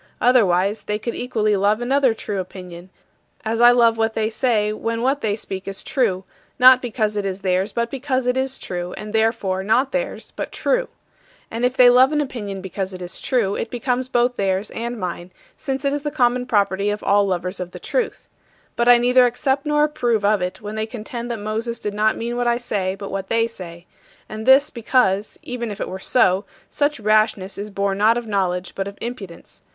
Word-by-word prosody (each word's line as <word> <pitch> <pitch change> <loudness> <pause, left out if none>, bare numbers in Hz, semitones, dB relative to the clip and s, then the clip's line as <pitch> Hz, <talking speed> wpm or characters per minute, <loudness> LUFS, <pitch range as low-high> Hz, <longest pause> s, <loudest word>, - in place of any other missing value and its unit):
Otherwise 205 -5 +3
they 210 - -1
could 235 +2 -4
equally 215 -4 0
love 205 +2 +2
another 260 -1 +2
true 205 -2 -4
opinion, 180 -1 -8 0.6
as 225 +1 0
I 240 - +9
love 235 -2 +4
what 225 0 0
they 220 0 0
say 215 -3 +1
when 230 +2 -3
what 275 +3 +1
they 205 -2 0
speak 190 -3 -7
is 195 0 -5
true 220 -10 0 0.3
not 255 0 +7
because 215 -3 -1
it 205 - 0
is 195 0 -4
theirs 190 +1 0
but 235 0 -2
because 265 -1 -1
it 250 0 +1
is 265 0 -1
true, 175 -1 -5
and 210 0 -8
therefore 220 -4 +1
not 250 +7 +2
theirs - - -4
but - - -5
true. - - 0 0.6
And 230 +2 -4
if 250 +1 +1
they 250 - +8
love 255 +3 +5
an 300 - +1
opinion 210 -9 -4
because 190 0 -5
it 185 - -9
is 175 - -7
true, 225 -7 +1
it 225 - -3
becomes 250 +1 -1
both 245 0 +1
theirs 195 +1 -1
and 235 0 -4
mine, 175 -1 -5 0.3
since 270 -1 -4
it 280 - +1
is 290 - -2
the 295 - -2
common 250 -3 +1
property 200 -3 +1
of 210 0 -3
all 200 0 +3
lovers 180 0 -2
of 180 -1 -4
the - - -10
truth. - - -3 0.5
But 235 +1 +2
I 245 - +9
neither 250 +1 +4
accept 270 +4 -1
nor 295 0 +3
approve 240 -8 0
of 210 -1 +3
it 180 0 -4
when 210 0 -6
they 220 0 -2
contend 235 +1 -6
that 235 - -2
Moses 220 +3 -3
did 210 -2 -4
not 215 +1 +1
mean 235 +1 -3
what 245 0 0
I 235 0 +2
say 195 -6 -2
but 200 0 -8
what 195 -1 -4
they 230 0 +2
say 175 -6 -10 0.4
and 215 +2 -7
this 275 +3 +6
because, 220 -4 +1
even 240 -2 -4
if 205 - -7
it - - -3
were 190 - -6
so, 190 -3 +2 0.3
such 290 -2 0
rashness 215 -2 +1
is 205 +1 -5
born 200 -1 -1
not 220 +3 +4
of 240 - -4
knowledge, 185 -4 -1
but 195 0 -3
of 200 - -9
impudence. 215 -8 -8
220 Hz, 210 wpm, -21 LUFS, 195-245 Hz, 0.6 s, I